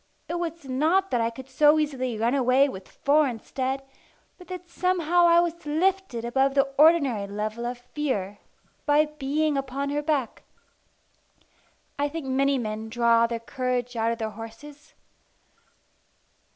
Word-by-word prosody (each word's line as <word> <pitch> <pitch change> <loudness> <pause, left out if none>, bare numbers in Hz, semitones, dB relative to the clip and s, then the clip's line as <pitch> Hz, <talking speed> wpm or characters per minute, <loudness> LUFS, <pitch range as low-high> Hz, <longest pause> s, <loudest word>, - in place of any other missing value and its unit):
It 345 - -3
was 335 -3 -5
not 320 +9 +1
that 245 - +1
I 230 - +1
could 255 +3 -11
so 295 +3 +4
easily 260 -6 -1
run 230 +3 +1
away 265 +1 +4
with 190 -8 -8
four 295 +1 +2
instead, 260 +3 -3 0.6
but 360 - -14
that 360 -1 -8
somehow 350 -1 +2
I 340 0 +6
was 340 -1 -3
lifted 315 -5 0
above 270 +3 +1
the 275 - +5 0.2
ordinary 285 -10 +4
level 215 +3 -4
of 245 0 -4
fear 245 -6 -3 0.5
by 295 +1 +4
being 300 0 -1
upon 275 +1 -3
her 295 +1 -1
back. 290 -6 -1 1.6
I 290 0 +1
think 320 -1 -6
many 275 +1 +1
men 220 -2 -4
draw 230 0 +3
their 230 0 -3
courage 250 +1 -3
out 225 0 +1
of 230 - -3
their 220 -1 -3
horses. 225 +7 -11
270 Hz, 150 wpm, -26 LUFS, 235-305 Hz, 1.6 s, I